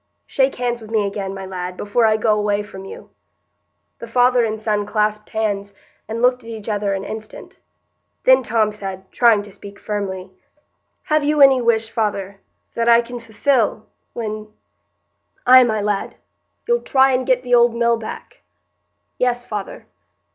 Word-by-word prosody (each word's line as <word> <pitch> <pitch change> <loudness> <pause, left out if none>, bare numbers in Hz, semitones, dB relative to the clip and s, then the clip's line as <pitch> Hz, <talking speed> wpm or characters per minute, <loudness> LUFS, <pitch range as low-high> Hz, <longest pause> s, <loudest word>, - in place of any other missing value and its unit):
Shake 270 0 +1
hands 240 -1 -2
wi' 220 - -10
me 215 -2 0
again, 195 -1 -4
my 195 0 -7
lad, 180 -1 -6
before 220 +3 +1
I 215 0 +3
go 215 0 +2
away 205 0 0
from 195 -2 -10
you." - - -11 0.9
The 235 - -8
father 245 +1 +3
and 220 -1 -2
son 210 -2 -1
clasped 210 0 -1
hands 205 -2 -2 0.3
and 230 +2 -4
looked 250 0 +2
at 230 - -11
each 220 -2 -7
other 205 -2 -1
an 195 - -4
instant. 215 +1 -9 0.6
Then 260 0 +6
Tom 225 -3 +1
said, 190 -2 -8
trying 230 -4 +4
to 205 - -13
speak 200 +1 -12
firmly,— 190 -3 -5 0.7
"Have 305 -1 +1
you 300 +1 +1
any 270 -2 +7
wish, 225 -1 +1
father—that 205 +2 -3
I 235 0 +6
can 240 +1 -8
fulfil, 225 0 0 0.3
when——" 215 -2 -5 1.0
"Ay, 255 +1 +8
my 220 -2 0
lad—you'll 210 - -4
try 265 0 +3
and 255 0 +1
get 255 -1 +1
the 245 -1 -2
old 240 -1 +5
mill 235 0 +2
back." 225 - -9 0.8
"Yes, 245 -1 0
father." 205 -3 -6
220 Hz, 160 wpm, -20 LUFS, 205-245 Hz, 1.0 s, Ay